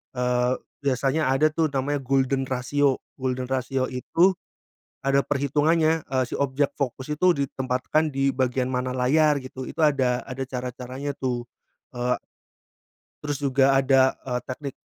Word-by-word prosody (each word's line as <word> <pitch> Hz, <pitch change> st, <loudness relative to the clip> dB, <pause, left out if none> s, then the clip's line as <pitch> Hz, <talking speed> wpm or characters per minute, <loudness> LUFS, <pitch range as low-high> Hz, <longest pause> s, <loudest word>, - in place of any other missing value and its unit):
eee, 125 Hz, 0 st, +1 dB, 0.3 s
biasanya 135 Hz, +2 st, +1 dB
ada 145 Hz, +4 st, +3 dB
tuh 160 Hz, 0 st, +1 dB
namanya 140 Hz, +2 st, 0 dB
golden 135 Hz, 0 st, +1 dB
ratio 135 Hz, +2 st, +1 dB, 0.2 s
golden 130 Hz, -1 st, -2 dB
ratio 130 Hz, 0 st, -1 dB
itu, 165 Hz, +9 st, +3 dB, 0.8 s
ada 140 Hz, 0 st, +4 dB
perhitungannya, 155 Hz, +3 st, +2 dB
eee, 130 Hz, -1 st, 0 dB
si -, -, -6 dB
objek 140 Hz, 0 st, 0 dB
fokus 130 Hz, 0 st, -3 dB
itu 180 Hz, +4 st, +4 dB
ditempatkan 130 Hz, +5 st, -1 dB
di 135 Hz, 0 st, +1 dB
bagian 130 Hz, 0 st, 0 dB
mana 125 Hz, 0 st, -1 dB
layar 145 Hz, +4 st, +3 dB
gitu, 130 Hz, 0 st, -8 dB
itu -, -, -7 dB
ada 130 Hz, -5 st, +3 dB
ada 130 Hz, +1 st, -4 dB
cara-caranya 130 Hz, +2 st, -5 dB
tuh, 120 Hz, -2 st, -2 dB, 0.5 s
eee 125 Hz, +1 st, 0 dB, 1.1 s
terus 145 Hz, -1 st, -2 dB
juga 135 Hz, 0 st, +3 dB
ada, 130 Hz, -1 st, +4 dB, 0.2 s
eee, 125 Hz, -1 st, -1 dB
teknik 135 Hz, +1 st, -6 dB
135 Hz, 135 wpm, -25 LUFS, 125-145 Hz, 1.1 s, ada